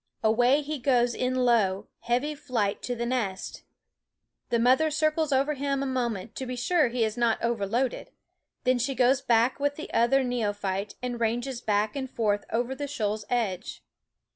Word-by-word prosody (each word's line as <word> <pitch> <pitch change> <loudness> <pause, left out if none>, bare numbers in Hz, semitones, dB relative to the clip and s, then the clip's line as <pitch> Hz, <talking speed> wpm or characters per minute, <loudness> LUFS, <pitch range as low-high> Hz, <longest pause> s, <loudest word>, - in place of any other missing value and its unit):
Away 245 +6 +4
he 300 0 -4
goes 245 -2 +2
in 255 +2 -1
low 200 -5 +2
heavy 250 +6 0
flight 235 -8 -2
to 245 - -3
the 235 0 -3
nest. 225 -7 -3 0.9
The 235 - +2
mother 255 +7 +4
circles 310 0 +1
over 275 +3 +2
him 275 -1 -1
a - - -2
moment 235 -6 -2
to 260 - -4
be 250 - -3
sure 300 +5 +2
he 235 0 0
is 220 +1 -4
not 235 -2 +2
overloaded; 235 +2 -1 0.5
then 255 -1 +2
she 265 +3 -1
goes 255 +2 +3
back 240 +1 +2
with 285 0 0
the 315 - -8
other 265 +4 +3
neophyte 205 -5 -2
and 245 -1 -3
ranges 240 +2 -1
back 210 +1 0
and 265 -2 -3
forth 210 -4 0
over 240 +3 0
the 285 +2 -4
shoal's 215 -6 -2
edge. 215 - -2
245 Hz, 170 wpm, -27 LUFS, 225-270 Hz, 0.9 s, Away